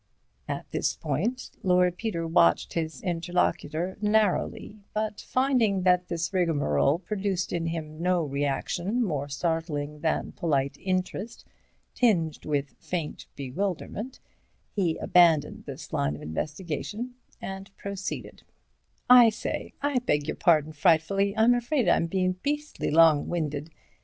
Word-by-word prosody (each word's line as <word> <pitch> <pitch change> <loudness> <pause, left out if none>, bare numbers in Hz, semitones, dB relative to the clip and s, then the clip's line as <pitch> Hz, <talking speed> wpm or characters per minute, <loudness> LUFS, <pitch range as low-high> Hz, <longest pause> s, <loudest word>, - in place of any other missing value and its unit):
At - - -4
this - - 0
point, 250 +2 -2
Lord 180 -3 +3
Peter 180 -5 -3
watched 85 - +3
his 160 -3 -3
interlocutor 175 -1 -1
narrowly, 210 0 +1 0.2
but 215 -1 -2
finding 245 -8 +1
that 180 -1 +3
this 165 +1 -3
rigmarole 150 - +2
produced 195 -1 -2
in 170 -1 -1
him 160 -1 -5
no 180 -1 +2
reaction 145 - -1
more 145 -8 -2
startling 150 -1 -2
than 160 +1 -1
polite 140 -4 0
interest 185 +4 -3 0.5
tinged 175 -11 +1
with 145 -2 -1
faint 170 -4 -4
bewilderment, 195 - -4 0.5
he 175 -6 0
abandoned 170 -4 +3
this - - -8
line 70 +1 0
of - - -10
investigation, 170 - -4 0.3
and 195 0 -7
proceeded: 200 -1 -5 0.7
"I 245 -2 +9
say, 215 - -4
I 285 -3 +2
beg 150 - 0
your - - -2
pardon, 155 -5 +3
frightfully—I'm 195 +8 +3
afraid 245 +2 0
I'm 165 - +3
bein' 185 +1 0
beastly 295 +1 -2
long 160 -1 +5
winded. 150 -3 -2
175 Hz, 120 wpm, -27 LUFS, 155-205 Hz, 0.7 s, I